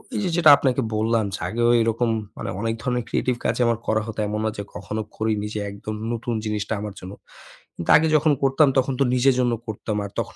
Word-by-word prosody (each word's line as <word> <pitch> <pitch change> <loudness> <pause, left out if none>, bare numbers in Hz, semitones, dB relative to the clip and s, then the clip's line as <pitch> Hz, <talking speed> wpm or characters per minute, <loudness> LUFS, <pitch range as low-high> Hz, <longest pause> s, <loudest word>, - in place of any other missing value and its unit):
এইযে 205 -4 -1
যেটা 165 -3 +6
আপনাকে 130 -1 +1
বললাম 110 0 +1
যে, - - -8
আগেও 120 +1 +1
এরকম 115 +1 +1 0.3
মানে - - -5
অনেক 115 0 0
ধরনের 125 -2 -1
creative 125 -2 0
কাজই - - 0
আমার 115 -1 +1
করা 110 0 +2
হতো। 110 -1 -6
এমন 105 +1 -2
না - - +2
যে 100 - -3
কখনো 105 +3 -4 0.2
করি 110 0 0
নি 105 - -3
যে - - -1
একদম 105 +2 -6 0.2
নতুন 115 +1 -3
জিনিসটা 105 0 -2
আমার 105 -1 -5
জন্য। 95 +2 -8 0.7
কিন্তু 85 - 0
আগে 160 +1 +2
যখন 155 +1 +2
করতাম 135 +2 +4
তখন 130 +1 +2
তো - - +5
নিজের 130 +1 +3
জন্য 120 -1 +2
করতাম। 105 0 -4
আর 100 - -8
তখন - - -4
115 Hz, 220 wpm, -23 LUFS, 105-130 Hz, 0.7 s, যেটা